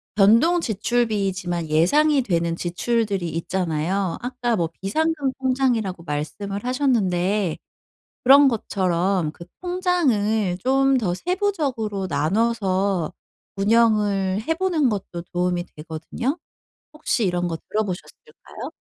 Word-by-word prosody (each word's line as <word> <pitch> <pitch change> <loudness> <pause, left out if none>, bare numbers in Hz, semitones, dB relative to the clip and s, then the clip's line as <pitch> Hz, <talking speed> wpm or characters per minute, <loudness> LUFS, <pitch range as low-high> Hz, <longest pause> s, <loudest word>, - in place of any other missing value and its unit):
변동지출비이지만 210 - +2
예상이 275 - +3
되는 170 -6 0
지출들이 195 +2 -1
있잖아요. 170 +2 -1
아까 245 -1 -1
뭐 170 -5 0
비상금 290 +6 0
통장이라고 245 -9 0
말씀을 170 +7 -4
하셨는데 205 - +1 0.7
그런 275 +2 +8
것처럼 185 -6 0
그 170 +2 -12 0.2
통장을 255 - +1
좀 270 +5 +2
더 195 -7 0
세부적으로 270 - -1
나눠서 190 +1 0 0.4
운영을 205 -2 +2
해 325 +8 -1
보는 335 -6 +1
것도 190 -5 -4
도움이 180 -1 0
되거든요. 165 - -4 0.5
혹시 305 -7 0
이런 175 -1 0
거 165 - -3
들어 215 - +1
보셨을까요? 210 - -8
205 Hz, 270 characters per minute, -23 LUFS, 180-255 Hz, 0.7 s, 그런